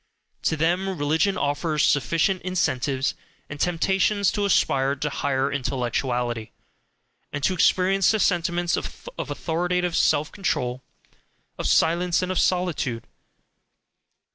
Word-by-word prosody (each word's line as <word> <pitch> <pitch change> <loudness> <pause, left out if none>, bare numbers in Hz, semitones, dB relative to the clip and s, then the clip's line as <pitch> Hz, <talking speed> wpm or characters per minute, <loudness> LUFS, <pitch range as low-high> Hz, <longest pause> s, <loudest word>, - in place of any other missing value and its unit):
To 160 - 0
them 175 +5 +1
religion 160 +7 +1
offers 150 +1 0
sufficient 165 +6 +1
incentives 140 -7 0 0.4
and 145 - -7
temptations 190 +4 +1
to 205 - -1
aspire 135 -8 +2
to 150 +2 -2
higher 135 0 -1
intellectuality, 125 -3 -2 0.8
and 145 -1 -5
to 190 - +2
experience 185 +1 +3
the 220 - +3
sentiments 175 -2 +1
of - - -7
authoritative 175 +1 -1
self 155 +1 +2
control, 130 -10 -2 0.8
of - - -1
silence, 175 +2 +2
and 185 - -2
of 185 - 0
solitude. 170 -10 0
165 Hz, 115 wpm, -24 LUFS, 140-180 Hz, 0.8 s, experience